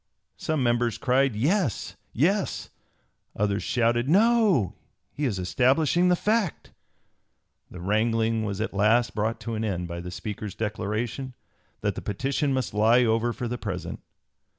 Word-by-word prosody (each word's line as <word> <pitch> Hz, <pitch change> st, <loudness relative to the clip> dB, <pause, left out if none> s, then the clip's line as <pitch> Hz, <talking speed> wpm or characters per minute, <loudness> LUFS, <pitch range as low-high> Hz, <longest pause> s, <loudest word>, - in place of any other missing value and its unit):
Some 155 Hz, -4 st, -1 dB
members 120 Hz, -2 st, +1 dB
cried 130 Hz, -1 st, +2 dB
"Yes! 145 Hz, -, 0 dB, 0.2 s
Yes!"; 190 Hz, -, 0 dB, 0.6 s
others 100 Hz, 0 st, 0 dB
shouted 120 Hz, +1 st, +1 dB
"No! 205 Hz, -, +4 dB, 0.4 s
he 145 Hz, -, -3 dB
is 110 Hz, -7 st, -1 dB
establishing 135 Hz, -, +2 dB
the 180 Hz, -, +5 dB
fact." 210 Hz, -2 st, -1 dB, 1.0 s
The 90 Hz, -, -10 dB
wrangling 110 Hz, +3 st, +1 dB
was 100 Hz, -2 st, -3 dB
at 110 Hz, -, -2 dB
last 110 Hz, +4 st, +3 dB
brought 110 Hz, +2 st, -1 dB
to 115 Hz, -, -4 dB
an 110 Hz, 0 st, -2 dB
end 90 Hz, -5 st, -2 dB
by 85 Hz, 0 st, -5 dB
the 90 Hz, -, -7 dB
Speaker's 100 Hz, +3 st, -6 dB
declaration, 110 Hz, +4 st, -3 dB, 0.5 s
that -, -, 0 dB
the -, -, -6 dB
petition 135 Hz, +7 st, -1 dB
must 130 Hz, -1 st, -1 dB
lie 115 Hz, +4 st, +4 dB
over 115 Hz, +1 st, +1 dB
for 120 Hz, +1 st, -4 dB
the 120 Hz, +1 st, -4 dB
present. 95 Hz, -5 st, -5 dB
115 Hz, 145 wpm, -26 LUFS, 105-135 Hz, 1.0 s, the